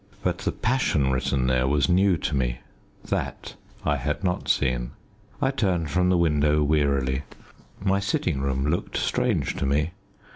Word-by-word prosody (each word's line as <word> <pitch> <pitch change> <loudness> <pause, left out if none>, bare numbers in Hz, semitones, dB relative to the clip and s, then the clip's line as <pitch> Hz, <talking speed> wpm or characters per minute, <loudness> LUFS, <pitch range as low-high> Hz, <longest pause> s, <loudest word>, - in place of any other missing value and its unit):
But - - 0
the - - -1
passion 110 - +1
written 65 0 0
there 65 0 +2
was 70 0 +2
new 95 0 +3
to 75 - -2
me. - - 0 0.5
That - - -3 0.3
I 75 - +2
had 75 +7 -3
not 90 -1 -1
seen. 60 -2 +1 0.5
I 135 - +2
turned 90 - 0
from 90 0 +2
the 90 - +3
window 75 -2 +3
wearily. 70 -3 +1 0.6
My 95 0 +1
sitting 90 -7 -1
room 70 0 -1
looked 75 +4 -1
strange - - 0
to 70 - -1
me. 75 +4 +1
75 Hz, 155 wpm, -25 LUFS, 65-90 Hz, 0.6 s, new